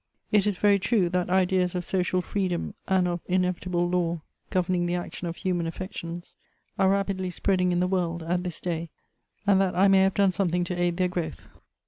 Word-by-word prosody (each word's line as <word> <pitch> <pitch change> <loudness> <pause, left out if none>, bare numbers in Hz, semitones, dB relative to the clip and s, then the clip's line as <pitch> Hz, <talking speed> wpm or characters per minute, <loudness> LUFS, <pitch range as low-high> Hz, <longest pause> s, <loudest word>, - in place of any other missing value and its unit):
It 210 -1 +4
is 205 -3 0
very 200 0 +4
true 195 -3 +2
that 180 0 -1
ideas 185 -1 +2
of 180 -1 -2
social 180 -1 0
freedom 185 -4 -2
iind 190 -1 +3
of 175 0 -1
in 185 0 +2
evitable 180 -1 -1
law 170 -2 0 0.3
governing 180 -2 +1
the 175 - 0
action 175 0 -5
of 170 - -4
human 175 -3 -1
affections 170 0 -7 0.4
are 190 -1 +4
rapidly 195 -1 0
spreading 180 0 +1
in 175 0 +1
the 180 - +2
world, 175 -3 -1
at 175 +2 -1
this 180 -3 -5
day, 170 -2 -3 0.6
and 200 -1 +4
that 190 -2 0
I 195 +2 +5
may 195 0 +6
have 190 0 +2
done 200 -2 +4
something 180 -2 0
to 175 - -3
aid 175 -1 0
their 185 -1 +2
growth. 175 -3 -5
180 Hz, 200 wpm, -26 LUFS, 175-190 Hz, 0.6 s, may